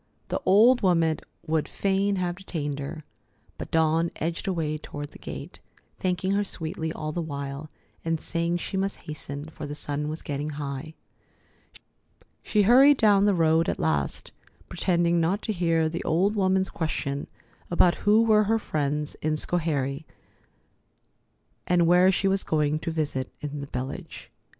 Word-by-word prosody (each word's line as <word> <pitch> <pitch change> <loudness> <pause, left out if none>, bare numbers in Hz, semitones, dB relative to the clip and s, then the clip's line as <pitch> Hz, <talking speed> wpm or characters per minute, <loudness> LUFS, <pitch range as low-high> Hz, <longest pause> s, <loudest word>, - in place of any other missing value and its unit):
The - - -2
old 230 +6 +6
woman 165 -4 +2 0.3
would 160 -1 0
fain 195 +1 0
have 180 -2 -1
detained 150 -7 -4
her, 150 +3 -6 0.6
but - - -6
Dawn 160 +1 +2
edged 165 +5 -3
away 160 -5 -1
toward 145 -1 -7
the - - -14
gate, - - -8 0.4
thanking 185 +1 0
her 200 +1 +2
sweetly 160 -4 -4
all 155 -1 -4
the 175 - -2
while, 140 -1 -5 0.3
and 165 -1 -1
saying 170 +1 -1
she 185 - -5
must 195 +1 -2
hasten, 145 -2 -6
for 155 -1 -8
the 145 - -5
sun 150 0 -2
was 155 +1 -5
getting 145 +1 -3
high. 145 +2 -5 1.5
She 210 -1 +2
hurried 265 +6 +7
down 205 -3 +4
the 205 -2 +3
road 165 0 +3
at - - -1
last, 75 -3 -1 0.4
pretending 170 -1 +1
not 185 +6 0
to 220 - -1
hear 165 -3 +1
the 165 +2 -4
old 190 +6 +1
woman's 190 -1 +2
question 145 -3 -3 0.4
about 175 0 +4
who 215 +2 +5
were 215 -2 +4
her 225 +2 +2
friends 150 -6 -2
in 155 0 0
Schoharie, 150 -3 +1 1.6
and 175 -1 +3
where 180 +2 +5
she 195 +1 0
was 195 0 +2
going 150 -1 0
to 165 - -4
visit 150 -5 -2
in 145 -1 -5
the 140 - -6
village. 130 +1 -6
165 Hz, 155 wpm, -26 LUFS, 150-190 Hz, 1.6 s, hurried